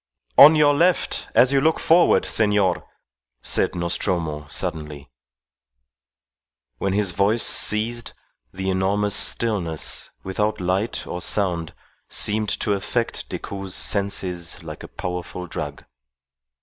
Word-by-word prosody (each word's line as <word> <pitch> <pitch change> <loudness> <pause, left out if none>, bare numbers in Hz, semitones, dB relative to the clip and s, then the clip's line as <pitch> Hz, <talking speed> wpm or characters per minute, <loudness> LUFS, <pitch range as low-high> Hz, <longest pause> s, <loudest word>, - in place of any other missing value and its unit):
"On 150 +3 +9
your 150 -1 +4
left 175 +4 0
as 125 +4 +5
you 135 - +3
look 160 +2 +2
forward, 170 +2 +4
senor," 105 -4 +1 0.6
said - - +1
Nostromo, 85 -3 -2
suddenly. 75 -5 -5 1.7
When 95 -1 -1
his 100 -2 +1
voice 100 +6 +2
ceased, 115 +2 +1 0.4
the 95 0 -3
enormous 100 +2 0
stillness, 100 -8 -1
without 105 +3 -2
light 95 +5 -2
or 90 - -6
sound, 90 -5 -1 0.3
seemed 105 0 +2
to 105 - +1
affect 115 +4 -3
Decoud's 95 -2 -6
senses 90 -4 -1
like - - -9
a - - -9
powerful 90 0 -6
drug. - - -6
100 Hz, 110 wpm, -22 LUFS, 90-110 Hz, 1.7 s, On